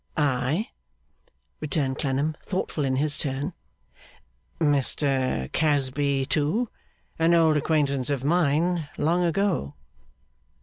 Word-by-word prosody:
'Ay?' 145 - 0 0.9
returned 140 -3 -1
Clennam, 145 +2 0
thoughtful 180 -5 -2
in 130 -1 0
his 145 +2 +1
turn. 145 +4 -2 1.1
'Mr 135 - +1
Casby, 140 -2 +1
too! 155 - 0 0.5
An 165 +1 +4
old 160 -2 +4
acquaintance 145 -4 +1
of 140 -3 -1
mine, 165 +1 +1
long 170 +4 +2
ago! 175 - 0
145 Hz, 95 wpm, -25 LUFS, 135-165 Hz, 1.1 s, An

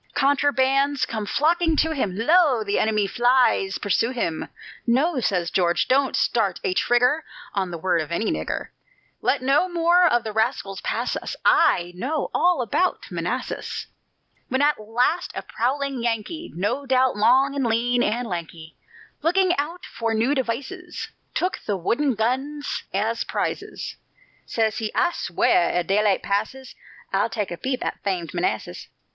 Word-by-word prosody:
Contrabands 275 0 +2
come 215 -2 -4
flocking 325 +4 +2
to 320 +1 +2
him: 210 -11 -2
"Lo! 285 -1 +4
the 200 -1 0
enemy 215 -2 +2
flies 240 -3 +2
pursue 205 +3 +1
him!" 230 -11 -2 0.4
"No," 270 +5 +2
says 180 -7 0
George, 175 -2 +2
"don't 270 +1 +2
start 205 -6 +1
a 185 - 0
trigger 250 +9 +2 0.3
On 190 -2 -1
the 170 - -5
word 170 0 +1
of 155 - -7
any 215 +6 0
nigger; - - -3 0.5
Let 275 - +1
no 275 +8 +3
more 345 +1 +4
of 240 -7 +2
the 220 - -5
rascals 220 -3 -1
pass - - -2
us, - - -5
I 175 0 +4
know 275 - -2
all 350 -7 +3
about 355 - -1
Manassas." - - -3 0.6
When 260 - 0
at 295 -3 +2
last 240 +10 0
a - - -4
prowling 270 +2 -2
Yankee 235 +9 -3
No 205 +10 -2
doubt 260 0 +3
long, 260 +6 +4
and 275 - 0
lean, 240 +2 +1
and 235 +3 0
lanky 165 -3 -6 0.5
Looking 355 +3 +3
out 330 +5 -3
for 230 -1 -2
new 235 +6 +2
devices, 285 +8 -4 0.3
Took 365 - 0
the 205 -2 0
wooden 245 - 0
guns 265 +7 -2
as 220 +4 -1
prizes, - - -4 0.5
Says 225 0 0
he: 220 -2 -3
"I 345 - +3
sweow, 175 - -2 0.3
ere 175 - +1
daylight 200 +2 +2
passes 220 +6 -2 0.4
I'll - - +2
take 210 -5 -3
a - - -3
peep 260 +4 -3
at - - -4
famed 180 -5 -2
Manassas." 110 - -2
240 Hz, 155 wpm, -23 LUFS, 205-285 Hz, 0.6 s, Lo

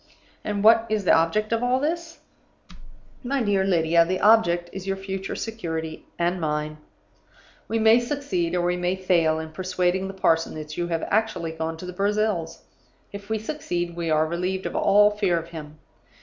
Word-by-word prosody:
"And 205 -1 -2
what 225 +1 +6
is 215 -2 -1
the - - +5
object 210 +7 +2
of 230 - 0
all 250 +1 +2
this? 330 +3 -3 1.0
"My 265 0 -1
dear 200 -3 +2
Lydia, 170 -3 +3
the 185 +2 -2
object 190 -6 +4
is 195 0 -7
your 195 0 -1
future 195 0 -5
security 160 -8 -5
(and 175 +1 0
mine). 150 0 -2 0.9
We 225 - -1
may 220 +1 +5
succeed 240 - -2
or 175 - +1
we 180 0 0
may 180 +1 0
fail, 170 -4 +2
in 160 0 -6
persuading 185 +2 -1
the 195 - -8
parson 165 -4 +1
that 155 -1 -7
you 175 0 -2
have 165 -2 -2
actually 200 -6 0
gone 160 0 -4
to 180 - -8
the 180 - -6
Brazils. 200 -3 -1 0.5
If 200 0 -9
we 220 - 0
succeed, 175 - -4
we 170 -1 -3
are 155 0 +3
relieved 180 +3 -3
of - - -4
all 205 +1 +5
fear 200 -4 +1
of 165 0 -5
him. 155 -2 -9
185 Hz, 180 wpm, -24 LUFS, 165-215 Hz, 1.0 s, what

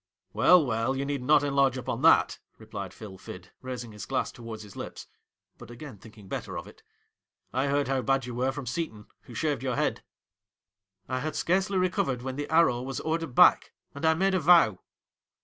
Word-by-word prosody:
' - - -50
Well, 180 -4 +5
well, 115 +2 0
you 135 +1 -2
need 140 -2 -2
not 145 +3 +4
enlarge 140 -2 +2
upon 130 - -4
that,' - - +4 0.2
replied 105 -4 -7
Phil 95 -2 -11
Fid, 90 -1 -10
raising 125 -3 -6
his 105 -3 -9
glass 130 -1 -1
towards 115 -2 -9
his 100 -2 -13
lips, - - -7 0.5
but - - -12
again 120 -2 -10
thinking 105 -1 -15
better - - -5
of - - -6
it; - - -15 0.7
'I 130 +3 +1
heard 140 0 +1
how 135 -1 0
bad 135 0 +1
you 125 - -6
were 125 +2 0
from 140 -1 -7
Seton, 125 -6 -4 0.2
who 120 - -12
shaved 145 0 -1
your 130 -2 -1
head.' - - -1 1.1
'I 130 0 -2
had 155 +2 -4
scarcely 190 +4 +1
recovered 140 -9 0
when 130 0 -4
the 145 +1 -4
"Arrow" 160 -7 +3
was 135 0 -4
ordered 160 -4 -2
back, - - +5 0.2
and 140 - -9
I 160 0 +4
made 190 +3 +1
a 185 - +2
vow.' 165 - +5
130 Hz, 200 wpm, -28 LUFS, 115-150 Hz, 1.1 s, Well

